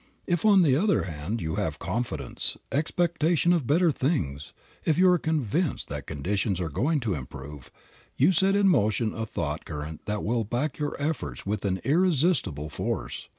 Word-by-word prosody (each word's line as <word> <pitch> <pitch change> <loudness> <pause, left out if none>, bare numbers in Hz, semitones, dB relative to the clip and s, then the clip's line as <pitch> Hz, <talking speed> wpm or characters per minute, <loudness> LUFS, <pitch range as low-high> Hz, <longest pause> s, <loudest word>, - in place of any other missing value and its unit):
If, 175 +1 0
on 200 -3 +6
the 140 -5 +4
other 200 +7 +2
hand, 85 +6 -4
you 80 0 -2
have - - -1
confidence, 80 - -3
expectation 170 +2 +2
of 155 -9 0
better 165 +3 +4
things, 85 - -2 0.3
if 155 - +1
you 185 +1 +6
are 180 - +3
convinced 155 - -1
that 70 -1 -5
conditions 95 +6 -1
are 85 -3 -2
going 145 - +1
to 110 -5 -1
improve, 70 -1 -8 0.5
you 145 +8 +5
set 190 +2 +3
in 200 -1 +4
motion 110 - +2
a 115 0 -4
thought 80 -5 -3
current 75 0 -7
that 105 0 -2
will 115 +1 0
back 125 +8 -2
your 145 -1 -3
efforts 140 - -3
with 105 +1 -2
an 95 -1 -1
irresistible 160 - +2
force. - - -4
120 Hz, 170 wpm, -27 LUFS, -, 0.5 s, on